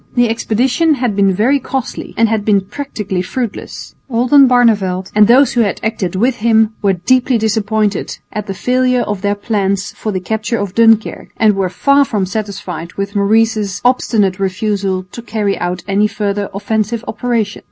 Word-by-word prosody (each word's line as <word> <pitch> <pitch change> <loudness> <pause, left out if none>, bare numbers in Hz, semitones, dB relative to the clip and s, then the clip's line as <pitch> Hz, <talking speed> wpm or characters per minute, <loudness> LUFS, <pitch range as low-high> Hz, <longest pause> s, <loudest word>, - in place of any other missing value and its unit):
The 245 -2 +3
expedition 250 +7 +1
had 245 -6 -1
been 195 -1 +3
very 235 +9 +2
costly 265 0 -5
and 230 - +4
had 220 -1 -1
been 205 -2 +3
practically 200 -4 -4
fruitless. 230 +3 -5 0.2
Oldenbarneveldt 235 -7 +3
and 210 0 +5
those 255 +2 +5
who 240 - +2
had 200 -5 -1
acted 215 -5 -2
with 240 +6 +1
him 220 0 +2
were 200 -2 +2
deeply 250 +8 +1
disappointed 215 -1 -1 0.2
at 210 0 -4
the 195 - -4
failure 250 +2 +1
of 205 -4 -3
their 205 0 0
plans 200 -2 -1
for 215 - -5
the 190 - -2
capture 220 +4 -2
of 200 -3 -4
Dunkirk 225 -1 +2
and 215 -2 +3
were 190 -2 -1
far 280 +10 +3
from 210 -7 -1
satisfied 185 -5 -5
with 200 +1 -4
Maurice's 210 -1 +1
obstinate 210 -6 +1
refusal 195 -1 -1
to 235 - -8
carry 210 -3 -2
out 175 0 -3
any 205 +1 +2
further 205 -1 -3
offensive 220 +3 -2
operations. 225 -2 -2
215 Hz, 165 wpm, -15 LUFS, 195-235 Hz, 0.2 s, and